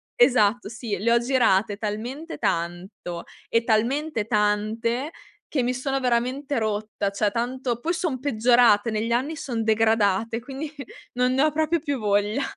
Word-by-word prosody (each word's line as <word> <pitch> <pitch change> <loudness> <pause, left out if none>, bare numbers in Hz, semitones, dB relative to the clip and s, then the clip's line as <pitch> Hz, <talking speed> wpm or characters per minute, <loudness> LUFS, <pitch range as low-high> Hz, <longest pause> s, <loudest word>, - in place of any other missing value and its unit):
esatto 240 -3 +3
sì, 215 -2 -4
le 230 +3 +1
ho 235 - +5
girate 230 -5 +2
talmente 235 +10 -5
tanto 175 +1 -3 0.3
e 230 0 +2
talmente 235 +2 0
tante, 220 +4 0 0.4
che 265 -5 -1
mi 250 - 0
sono 270 +2 -2
veramente 255 +3 0
rotta; 215 -2 -2
cioè 200 +1 0
tanto 245 +1 -2
poi 330 +7 -1
son 315 -8 -2
peggiorate 235 -4 +4
negli 220 +2 -2
anni, 265 +7 0
son 235 -6 -3
degradate, 220 0 +2
quindi 275 +4 -6 0.4
non 250 +1 +1
ne 265 - +2
ho 310 - +3
proprio 315 +2 +1
più 285 -2 -2
voglia. 210 +3 +1
235 Hz, 150 wpm, -24 LUFS, 215-265 Hz, 0.4 s, ho